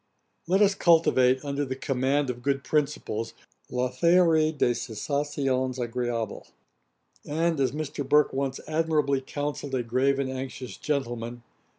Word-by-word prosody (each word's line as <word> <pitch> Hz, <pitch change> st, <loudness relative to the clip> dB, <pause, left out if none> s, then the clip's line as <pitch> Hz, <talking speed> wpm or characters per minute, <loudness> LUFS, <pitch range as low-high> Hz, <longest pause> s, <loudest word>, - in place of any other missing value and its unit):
Let 190 Hz, +4 st, +4 dB
us 200 Hz, -1 st, +4 dB
cultivate, 145 Hz, -8 st, +4 dB
under 140 Hz, 0 st, -1 dB
the 130 Hz, -2 st, -3 dB
command 135 Hz, +1 st, 0 dB
of 120 Hz, 0 st, -9 dB
good 140 Hz, +1 st, 0 dB
principles, 145 Hz, -8 st, -1 dB, 0.3 s
'la 125 Hz, 0 st, -1 dB
théorie 160 Hz, +1 st, +3 dB
des 120 Hz, -, +3 dB
sensations 130 Hz, +2 st, -2 dB
agréables;' 120 Hz, -2 st, -3 dB, 0.7 s
and, 160 Hz, +1 st, 0 dB
as 130 Hz, -3 st, +2 dB
Mr. 150 Hz, 0 st, -4 dB
Burke 150 Hz, 0 st, +4 dB
once 135 Hz, 0 st, -2 dB
admirably 155 Hz, -4 st, +1 dB
counselled 145 Hz, 0 st, -4 dB
a 125 Hz, -, 0 dB
grave 130 Hz, +4 st, +1 dB
and 140 Hz, -1 st, -1 dB
anxious 130 Hz, -1 st, -6 dB
gentleman, 120 Hz, -6 st, -2 dB
'live 120 Hz, 0 st, -11 dB
pleasant.' 115 Hz, -, -39 dB
135 Hz, 145 wpm, -27 LUFS, 125-150 Hz, 0.7 s, Let